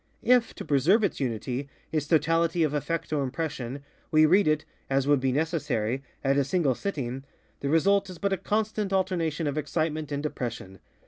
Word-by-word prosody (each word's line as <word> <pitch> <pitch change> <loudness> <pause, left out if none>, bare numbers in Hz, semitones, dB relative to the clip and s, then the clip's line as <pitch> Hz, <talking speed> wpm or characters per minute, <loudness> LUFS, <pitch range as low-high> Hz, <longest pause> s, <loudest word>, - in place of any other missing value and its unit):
If, 245 -1 +3
to - - -7
preserve 160 - +3
its 200 - 0
UnityŌĆöits 135 +4 -3
totality 165 +1 +3
of 150 -2 0
effect 160 +2 -2
or 140 -3 0
impressionŌĆöwe 140 -3 -4 0.4
read 190 +4 +4
it 155 0 +1 0.2
(as 135 0 +2
would 145 -1 +4
be 130 0 +1
necessary) 140 -6 -1 0.2
at 135 +1 +2
a - - +3
single 145 -1 +1
sitting, 135 -6 -4 0.4
the 140 - -2
result 195 +5 +3
is 180 - -8
but 200 +3 0
a - - 0
constant 210 0 -1
alternation 175 -5 0
of 145 +1 -1
excitement 155 0 -2
and 145 0 -2
depression. 115 -9 -5
155 Hz, 170 wpm, -27 LUFS, 135-175 Hz, 0.4 s, read